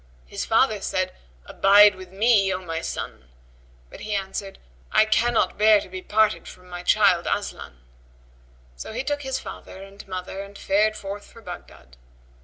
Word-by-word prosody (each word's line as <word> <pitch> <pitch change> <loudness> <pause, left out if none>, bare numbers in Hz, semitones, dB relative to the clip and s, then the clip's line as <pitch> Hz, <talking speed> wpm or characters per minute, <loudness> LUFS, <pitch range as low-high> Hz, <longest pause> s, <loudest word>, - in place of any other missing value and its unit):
His - - -5
father - - +2
said, - - -1 0.3
"Abide 205 +1 +6
with 185 -1 -12
me, 200 -1 +3
O 185 - -1
my 165 -1 -3
son;" - - -6 0.6
but - - -11
he 215 -1 -3
answered; 195 0 -4 0.3
"I - - +5
cannot 230 +1 +1
bear 215 0 +6
to - - -9
be 185 0 -7
parted 215 +2 +1
from 180 0 -13
my 175 0 -6
child 190 -2 +3
Aslan." 65 -1 -4 0.9
So 140 - -8
he 245 +4 -3
took 290 +1 -2
his 265 -1 -2
father 190 - -9
and 195 +1 -13
mother 185 +1 -5
and 200 0 -10
fared 210 +2 +1
forth 200 +1 -7
for 230 - -15
Baghdad. 65 - -11
200 Hz, 165 wpm, -24 LUFS, 185-215 Hz, 0.9 s, Abide